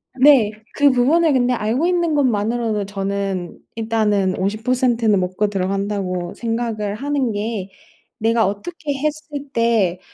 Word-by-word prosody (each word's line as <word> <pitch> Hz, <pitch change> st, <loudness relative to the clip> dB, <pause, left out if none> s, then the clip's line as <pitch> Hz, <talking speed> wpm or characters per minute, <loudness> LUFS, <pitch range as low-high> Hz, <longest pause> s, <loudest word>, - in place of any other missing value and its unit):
네 260 Hz, -5 st, +5 dB, 0.2 s
그 285 Hz, 0 st, +5 dB
부분을 295 Hz, +6 st, +3 dB
근데 250 Hz, -1 st, +2 dB
알고 235 Hz, +6 st, 0 dB
있는 345 Hz, -3 st, +1 dB
것만으로도 225 Hz, -4 st, 0 dB
저는 195 Hz, -2 st, -3 dB, 0.2 s
일단은 215 Hz, -4 st, +1 dB
50% 230 Hz, +4 st, 0 dB
는 210 Hz, -3 st, +4 dB
먹고 185 Hz, +3 st, 0 dB
들어간다고 195 Hz, -2 st, -2 dB
생각을 225 Hz, -3 st, -2 dB
하는 275 Hz, 0 st, -1 dB
게 205 Hz, -2 st, -3 dB, 0.5 s
'내가 225 Hz, -1 st, +2 dB
어떻게 285 Hz, -, -4 dB
했을 295 Hz, 0 st, -4 dB
때 225 Hz, -7 st, +1 dB
225 Hz, 255 characters per minute, -20 LUFS, 200-260 Hz, 0.5 s, 네